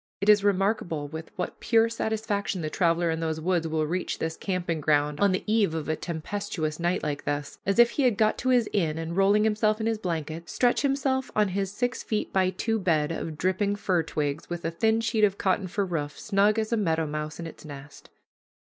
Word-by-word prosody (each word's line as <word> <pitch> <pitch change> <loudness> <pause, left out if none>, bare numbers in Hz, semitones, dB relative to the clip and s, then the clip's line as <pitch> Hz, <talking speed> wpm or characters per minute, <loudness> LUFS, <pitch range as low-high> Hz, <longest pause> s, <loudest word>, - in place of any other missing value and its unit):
It 200 +2 0
is 210 -1 +6
remarkable 195 -6 0
with 160 +2 -8
what 180 - -4
pure 230 -1 +3
satisfaction 215 -4 -2
the 155 - -3
traveler 170 -2 +2
in 160 - -2
those 160 -1 -2
woods 170 0 0
will 155 -1 0
reach 180 +4 -2
his 160 0 -3
camping 175 -4 -2
ground 150 0 +1
on 200 -1 +4
the 185 - -1
eve 210 -6 +2
of 160 -2 -3
a 155 - 0
tempestuous 170 -1 -4
night 175 +2 0
like 145 -2 -3
this, 145 0 -3
as 195 - +1
if 240 0 +6
he - - -1
had 245 -6 +3
got 215 0 +3
to 255 - -1
his 245 -4 +4
inn, 160 -6 +1
and, 165 +1 -4
rolling 200 +2 +4
himself 215 0 +2
in 220 - -2
his 225 -1 0
blanket, 165 -3 -4
stretch 245 -1 +2
himself 270 -1 0
on 210 -2 +3
his 195 0 -2
six 245 +4 -2
feet 215 -1 -3
by 185 -1 +3
two 225 +4 -1
bed 160 -5 +1
of 160 -1 -4
dripping 190 +4 0
fir 185 -4 +1
twigs, 150 -1 -3
with 175 -1 -5
a 165 - 0
thin 220 +6 +2
sheet 225 -1 0
of 200 -1 +3
cotton 190 0 0
for 200 +2 -1
roof, 150 -5 -4
snug 205 0 +2
as 220 +1 -1
a - - +2
meadow 165 -6 +1
mouse 150 +1 -5
in 170 - -5
its 165 - -10
nest. 145 -2 -11
185 Hz, 220 wpm, -27 LUFS, 160-215 Hz, -, is